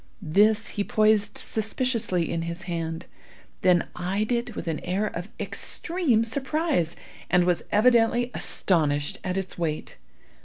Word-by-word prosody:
This 215 Hz, +3 st, +4 dB
he 205 Hz, -, -2 dB
poised 215 Hz, 0 st, +2 dB
suspiciously 220 Hz, -, 0 dB
in 170 Hz, -, -2 dB
his 170 Hz, +2 st, -5 dB
hand, 165 Hz, -2 st, -4 dB, 0.6 s
then 180 Hz, -2 st, +4 dB
eyed 195 Hz, +5 st, -1 dB
it 240 Hz, -1 st, -1 dB
with -, -, -5 dB
an 160 Hz, -2 st, -1 dB
air 190 Hz, +4 st, -1 dB
of 180 Hz, -1 st, -5 dB
extreme 330 Hz, -11 st, 0 dB
surprise, 265 Hz, -, 0 dB, 0.3 s
and 180 Hz, 0 st, +4 dB
was 175 Hz, -1 st, +1 dB
evidently 240 Hz, +2 st, +4 dB
astonished 145 Hz, -5 st, 0 dB
at 185 Hz, +1 st, -2 dB
its 190 Hz, -2 st, -4 dB
weight. 155 Hz, -3 st, -3 dB
200 Hz, 130 wpm, -26 LUFS, 175-230 Hz, 0.6 s, This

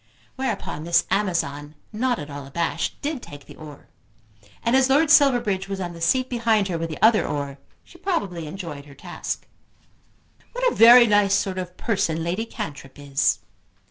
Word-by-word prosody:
Whereupon 225 Hz, -, -3 dB
Miss 170 Hz, 0 st, +2 dB
Amazon, 155 Hz, -7 st, -1 dB, 0.2 s
not 245 Hz, +3 st, 0 dB
at 150 Hz, -1 st, -8 dB
all 140 Hz, -1 st, -8 dB
abashed, 170 Hz, +5 st, -2 dB
did 290 Hz, -3 st, -3 dB
take 145 Hz, -7 st, -12 dB
the -, -, -13 dB
oar; 150 Hz, -2 st, -12 dB, 0.8 s
and 230 Hz, +2 st, +2 dB
as 265 Hz, 0 st, +4 dB
Lord 295 Hz, +3 st, +3 dB
Silverbridge 240 Hz, -10 st, +3 dB
was 195 Hz, -1 st, -4 dB
on 175 Hz, -2 st, -4 dB
the 170 Hz, -, -11 dB
seat 255 Hz, +10 st, +2 dB
behind 225 Hz, -5 st, +1 dB
her 170 Hz, -, -2 dB
with 165 Hz, 0 st, -3 dB
the 155 Hz, -, -7 dB
other 220 Hz, 0 st, +5 dB
oar 140 Hz, -1 st, -4 dB, 0.2 s
she 350 Hz, -, -18 dB
probably 195 Hz, -, -2 dB
enjoyed 155 Hz, -4 st, -7 dB
her 140 Hz, -, -14 dB
task. -, -, -6 dB, 1.1 s
"What -, -, +1 dB
a -, -, -6 dB
very 240 Hz, +2 st, +9 dB
nice 205 Hz, -2 st, +3 dB
sort 195 Hz, -2 st, -1 dB
of 180 Hz, 0 st, -7 dB
person 190 Hz, -7 st, -1 dB
Lady 185 Hz, +7 st, -2 dB
Cantrip 140 Hz, -8 st, -8 dB
is." 140 Hz, -1 st, 0 dB
190 Hz, 175 wpm, -23 LUFS, 155-235 Hz, 1.1 s, very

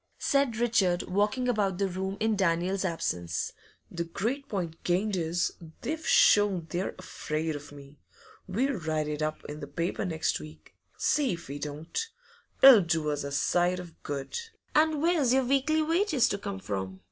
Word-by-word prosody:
said 275 Hz, -5 st, +1 dB
Richard, 210 Hz, -7 st, +2 dB
walking 210 Hz, +7 st, 0 dB
about 205 Hz, -6 st, +1 dB
the 200 Hz, 0 st, +1 dB
room 190 Hz, +2 st, -3 dB
in 220 Hz, 0 st, +1 dB
Daniel's 185 Hz, +1 st, +1 dB
absence. 90 Hz, -, -2 dB, 0.4 s
'The 170 Hz, -1 st, -3 dB
great 245 Hz, +11 st, -3 dB
point 170 Hz, -5 st, -4 dB
gained 190 Hz, +4 st, +1 dB
is, 170 Hz, 0 st, 0 dB, 0.3 s
they've 315 Hz, +5 st, -4 dB
shown 200 Hz, -5 st, +5 dB
they're 180 Hz, +2 st, -2 dB
afraid 160 Hz, -3 st, -3 dB
of 145 Hz, 0 st, -9 dB
me. 140 Hz, 0 st, -13 dB, 0.5 s
We'll 250 Hz, +9 st, 0 dB
write 155 Hz, -2 st, -1 dB
it 150 Hz, 0 st, -3 dB
up 155 Hz, 0 st, -3 dB
in 150 Hz, +1 st, -7 dB
the -, -, -7 dB
paper 170 Hz, +2 st, -2 dB
next 160 Hz, -4 st, -1 dB
week, 75 Hz, +1 st, -13 dB, 0.2 s
see 285 Hz, -9 st, +2 dB
if 170 Hz, -, -8 dB
we 145 Hz, +1 st, -5 dB
don't! 150 Hz, -, -4 dB, 0.6 s
It'll 265 Hz, -6 st, +11 dB
do 160 Hz, -3 st, 0 dB
us 145 Hz, -1 st, -2 dB
a 140 Hz, -, -5 dB
sight 175 Hz, +5 st, +2 dB
of 175 Hz, -2 st, -11 dB
good.' 140 Hz, -, -4 dB, 0.3 s
'And 310 Hz, -1 st, +3 dB
where's 320 Hz, -8 st, +3 dB
your 265 Hz, -1 st, +3 dB
weekly 275 Hz, +4 st, +2 dB
wages 330 Hz, -, +2 dB
to 200 Hz, -, -2 dB
come 200 Hz, -1 st, -5 dB
from? 95 Hz, -, -4 dB
185 Hz, 170 wpm, -29 LUFS, 155-235 Hz, 0.6 s, It'll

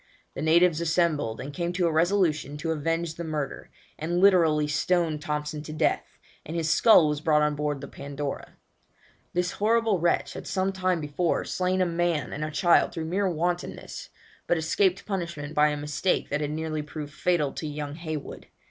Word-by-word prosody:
The -, -, -5 dB
natives 165 Hz, +1 st, +4 dB
assembled, 160 Hz, -9 st, +1 dB
and 140 Hz, +2 st, -6 dB
came 170 Hz, +1 st, -2 dB
to 180 Hz, 0 st, +1 dB
a 165 Hz, -, +2 dB
resolution 160 Hz, -4 st, +1 dB
to 160 Hz, +2 st, -2 dB
avenge 165 Hz, +1 st, -1 dB
the 170 Hz, -, -6 dB
murder, 150 Hz, -4 st, -4 dB, 0.3 s
and 170 Hz, +3 st, -1 dB
literally 165 Hz, -6 st, +4 dB
stoned 155 Hz, +1 st, +1 dB
Thompson 150 Hz, 0 st, -3 dB
to 155 Hz, 0 st, -8 dB
death, 155 Hz, -, -1 dB, 0.3 s
and 160 Hz, -, -7 dB
his 165 Hz, -2 st, 0 dB
skull 195 Hz, -7 st, +6 dB
was 150 Hz, 0 st, -1 dB
brought 155 Hz, -2 st, +3 dB
on 150 Hz, 0 st, +2 dB
board 145 Hz, -1 st, -2 dB
the 140 Hz, -, -7 dB
Pandora. 140 Hz, 0 st, -6 dB, 0.8 s
This 180 Hz, 0 st, 0 dB
horrible 220 Hz, -2 st, +2 dB
wretch 170 Hz, +1 st, +1 dB
had -, -, -8 dB
some 195 Hz, -1 st, 0 dB
time 185 Hz, -3 st, 0 dB
before 150 Hz, +4 st, -1 dB
slain 185 Hz, 0 st, 0 dB
a -, -, +4 dB
man 170 Hz, -6 st, -1 dB
and 150 Hz, -, -4 dB
a 155 Hz, -, -2 dB
child 170 Hz, +3 st, +3 dB
through 160 Hz, -, -4 dB
mere 190 Hz, +4 st, 0 dB
wantonness, 175 Hz, +1 st, -3 dB, 0.4 s
but 175 Hz, -, +2 dB
escaped 180 Hz, +4 st, +1 dB
punishment 170 Hz, -7 st, -4 dB
by 150 Hz, -1 st, +4 dB
a 150 Hz, 0 st, -1 dB
mistake 150 Hz, +5 st, -1 dB
that 145 Hz, +1 st, -1 dB
had 145 Hz, -, -1 dB
nearly 155 Hz, 0 st, -3 dB
proved 150 Hz, 0 st, -7 dB
fatal 160 Hz, -6 st, 0 dB
to 155 Hz, -, -5 dB
young 145 Hz, -1 st, -5 dB
Heywood. 155 Hz, -2 st, -6 dB
160 Hz, 185 wpm, -26 LUFS, 150-175 Hz, 0.8 s, skull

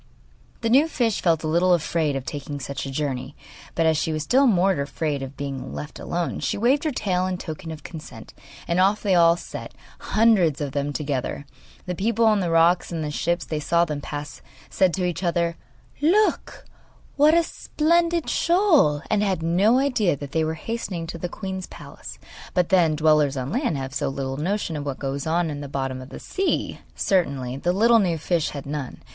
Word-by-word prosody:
The 230 Hz, -, 0 dB
new 280 Hz, +6 st, +5 dB
fish 235 Hz, -9 st, 0 dB
felt 165 Hz, -3 st, +2 dB
a -, -, -1 dB
little 175 Hz, +3 st, +4 dB
afraid 160 Hz, -3 st, -1 dB
of 135 Hz, -1 st, -4 dB
taking 145 Hz, 0 st, -5 dB
such 140 Hz, 0 st, -5 dB
a -, -, -5 dB
journey; 135 Hz, -1 st, -3 dB, 0.4 s
but 165 Hz, -, +2 dB
as 160 Hz, -1 st, +3 dB
she 160 Hz, -, -1 dB
was 155 Hz, -1 st, -2 dB
still 265 Hz, -, +4 dB
more 195 Hz, -3 st, +4 dB
afraid 145 Hz, 0 st, -2 dB
of 135 Hz, 0 st, -7 dB
being 140 Hz, -2 st, -5 dB
left 150 Hz, -, -7 dB
alone, 175 Hz, 0 st, -3 dB
she -, -, -1 dB
waved 260 Hz, +8 st, +2 dB
her 310 Hz, -, +1 dB
tail 185 Hz, -7 st, 0 dB
in 185 Hz, -1 st, -2 dB
token 160 Hz, -2 st, -7 dB
of 155 Hz, -2 st, -8 dB
consent, 145 Hz, -9 st, -10 dB, 0.3 s
and 170 Hz, +1 st, +1 dB
off 200 Hz, +3 st, +3 dB
they 200 Hz, -3 st, +2 dB
all 170 Hz, -1 st, +5 dB
set, -, -, -8 dB, 0.2 s
hundreds 205 Hz, -9 st, +3 dB
of 145 Hz, -2 st, -3 dB
them 145 Hz, +1 st, -2 dB
together. 140 Hz, -1 st, -3 dB, 0.4 s
The 180 Hz, -, -3 dB
people 225 Hz, +5 st, +1 dB
on 215 Hz, -2 st, +4 dB
the 180 Hz, -3 st, -1 dB
rocks 165 Hz, +2 st, +3 dB
and 170 Hz, -, -3 dB
in -, -, -3 dB
the 150 Hz, -, -3 dB
ships 170 Hz, +3 st, -1 dB
that 155 Hz, -1 st, -3 dB
saw 170 Hz, +3 st, +2 dB
them 150 Hz, -3 st, -4 dB
pass 145 Hz, 0 st, -7 dB, 0.3 s
said 185 Hz, -2 st, +3 dB
to 185 Hz, -, -1 dB
each 180 Hz, +1 st, -2 dB
other: 170 Hz, -2 st, 0 dB, 0.5 s
'Look 395 Hz, +8 st, +1 dB, 0.5 s
what 300 Hz, +3 st, +5 dB
a 340 Hz, -, +4 dB
splendid 335 Hz, +1 st, 0 dB
shoal!' 325 Hz, -, +3 dB
and 215 Hz, -1 st, +1 dB
had 190 Hz, -5 st, 0 dB
no 190 Hz, +9 st, +3 dB
idea 250 Hz, -, +2 dB
that 140 Hz, -1 st, -8 dB
they 160 Hz, +1 st, +1 dB
were 160 Hz, +1 st, -1 dB
hastening 185 Hz, -2 st, -4 dB
to 170 Hz, 0 st, -7 dB
the 175 Hz, -, -3 dB
queen's 190 Hz, -1 st, -5 dB
palace; -, -, -11 dB, 0.4 s
but, 180 Hz, -2 st, +2 dB
then, 170 Hz, -4 st, +4 dB
dwellers 150 Hz, -2 st, +3 dB
on 130 Hz, 0 st, -3 dB
land 235 Hz, -, 0 dB
have 135 Hz, 0 st, -5 dB
so -, -, -1 dB
little 135 Hz, -1 st, -4 dB
notion 175 Hz, +1 st, -2 dB
of 145 Hz, -, -4 dB
what 140 Hz, -2 st, -4 dB
goes 140 Hz, +2 st, -4 dB
on 165 Hz, 0 st, +1 dB
in 145 Hz, 0 st, -5 dB
the 145 Hz, -, -6 dB
bottom 135 Hz, -2 st, -3 dB
of 130 Hz, -, -11 dB
the -, -, -9 dB
sea! 385 Hz, 0 st, -2 dB, 0.2 s
Certainly 140 Hz, -9 st, 0 dB
the 175 Hz, +5 st, 0 dB
little 230 Hz, +5 st, +5 dB
new 175 Hz, -5 st, +1 dB
fish 165 Hz, 0 st, 0 dB
had 140 Hz, -2 st, -7 dB
none. 140 Hz, -2 st, -5 dB
170 Hz, 205 wpm, -24 LUFS, 145-195 Hz, 0.5 s, new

